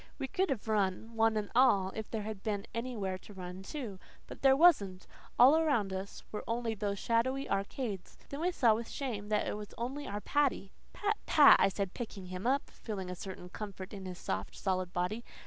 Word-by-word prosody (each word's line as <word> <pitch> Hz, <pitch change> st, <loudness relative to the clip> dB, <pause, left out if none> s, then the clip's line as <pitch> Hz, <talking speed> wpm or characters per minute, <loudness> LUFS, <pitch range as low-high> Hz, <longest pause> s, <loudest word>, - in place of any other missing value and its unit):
We 265 Hz, -, -3 dB
would 380 Hz, +1 st, +2 dB
have 235 Hz, -5 st, -2 dB
run, 215 Hz, +1 st, 0 dB
one 225 Hz, 0 st, +3 dB
and 210 Hz, -1 st, -3 dB
all, 200 Hz, -7 st, +4 dB
if 220 Hz, -1 st, -5 dB
there 220 Hz, -2 st, -3 dB
had 215 Hz, -2 st, -5 dB
been 205 Hz, -2 st, -2 dB
anywhere 225 Hz, -6 st, -3 dB
to 205 Hz, -, -14 dB
run 180 Hz, 0 st, -7 dB
to. 230 Hz, -10 st, -6 dB, 0.3 s
But -, -, -11 dB
there 270 Hz, -1 st, +6 dB
wasn't 200 Hz, -, +4 dB, 0.3 s
all 260 Hz, +5 st, +8 dB
around 280 Hz, -12 st, +2 dB
us 190 Hz, +1 st, -6 dB
were 210 Hz, -, -4 dB
only 230 Hz, 0 st, -1 dB
those 205 Hz, -1 st, -2 dB
shadowy 260 Hz, +6 st, +1 dB
arcades. 200 Hz, 0 st, -3 dB
Then 280 Hz, +2 st, -5 dB
we 360 Hz, +2 st, +2 dB
saw 240 Hz, -10 st, +4 dB
with 230 Hz, +1 st, -4 dB
shame 220 Hz, -7 st, -4 dB
that 210 Hz, -1 st, +1 dB
it -, -, -1 dB
was 210 Hz, 0 st, -8 dB
only 265 Hz, +5 st, -4 dB
our 205 Hz, +1 st, -4 dB
Paddy. 280 Hz, -9 st, +1 dB, 0.2 s
"Pat, 415 Hz, +1 st, -1 dB
Pat," 295 Hz, -2 st, +8 dB
I 195 Hz, -, +5 dB
said, 195 Hz, -1 st, -3 dB
picking 215 Hz, -6 st, -6 dB
him 185 Hz, +4 st, -4 dB
up, 275 Hz, +2 st, +2 dB
feeling 190 Hz, -5 st, -5 dB
a -, -, -4 dB
certain 180 Hz, -1 st, -8 dB
comfort 195 Hz, -1 st, -7 dB
in 195 Hz, -2 st, -6 dB
his 180 Hz, -1 st, -6 dB
soft, 95 Hz, -, -4 dB
solid 185 Hz, -2 st, -1 dB
body. 180 Hz, +6 st, -2 dB
210 Hz, 205 wpm, -32 LUFS, 190-250 Hz, 0.3 s, all